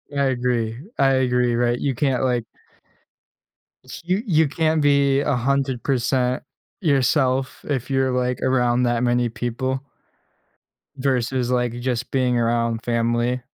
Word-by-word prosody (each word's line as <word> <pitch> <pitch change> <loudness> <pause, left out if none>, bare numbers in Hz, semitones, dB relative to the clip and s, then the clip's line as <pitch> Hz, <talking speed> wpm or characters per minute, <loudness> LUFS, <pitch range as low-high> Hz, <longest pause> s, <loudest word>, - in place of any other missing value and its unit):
I 140 - +2
agree, 120 -3 -1 0.2
I 135 -1 +4
agree, 125 -2 +1
right? 120 0 +1
You 140 - -1
can't 135 -2 0
like 120 -3 0 1.4
S 130 - -9
you 185 +4 0
you 160 -6 +3
can't 155 +1 0
be 140 -1 +3
100% 130 -1 0 0.4
yourself 135 -3 +1
if 135 -4 -2
you're, 135 -1 +1
like, 125 0 -1
around 125 -1 +2
that 120 -1 +1
many 120 -1 +1
people 130 +3 -3 1.1
versus, 130 -2 -1
like, 125 -1 0
just 125 -1 -2
being 125 -2 +1
around 115 -1 0
family. 120 +1 0
125 Hz, 125 wpm, -22 LUFS, 120-135 Hz, 1.4 s, I